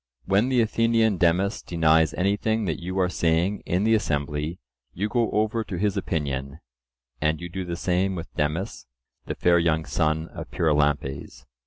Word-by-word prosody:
When 100 +6 +2
the 125 -2 +3
Athenian 115 -2 +2
Demus 90 +4 +2
denies 80 -2 +2
anything 105 +3 0
that 80 -2 -2
you 90 +2 -4
are 95 -1 +3
saying 85 +3 0
in 90 +3 +1
the 110 +1 +3
assembly, 75 -4 -1 0.4
you 100 +4 -1
go 115 +1 +1
over 110 +2 0
to 100 -4 -5
his 100 +2 0
opinion; 70 -6 -3 0.6
and 75 +1 +1
you 85 0 -6
do 95 +2 -4
the 85 -1 -4
same 95 +2 0
with 85 -1 -7
Demus, 80 +7 -2 0.4
the - - -3
fair 85 0 +3
young 80 -1 +1
son 80 0 0
of - - -8
Pyrilampes. 75 -3 0
90 Hz, 165 wpm, -25 LUFS, 80-100 Hz, 0.6 s, the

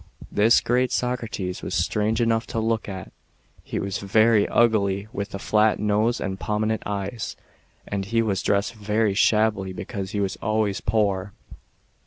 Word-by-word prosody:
This 110 +3 +4
great 125 +1 +1
Socrates 115 -7 -2
was - - -4
strange 110 +3 +1
enough 115 -1 +1
to 115 - -2
look 110 -1 -1
at. 95 -2 -7 0.5
He - - -5
was 100 0 -2
very 110 +1 +3
ugly, 100 -4 +2
with 100 -3 -4
a - - -2
flat 105 +2 +2
nose 105 +3 +1
and 95 0 -4
pro 105 - -1
minent 110 +1 0
eyes, 100 +2 -4 0.5
and 100 -1 -3
he 115 +3 +1
was 100 -4 0
dressed 100 +3 +1
very 105 -1 0
shabbily, 105 -2 +2
because 100 0 -5
he 105 - -3
was 100 -1 -1
always 110 -1 0
poor. 100 -3 0
105 Hz, 160 wpm, -24 LUFS, 100-110 Hz, 0.5 s, This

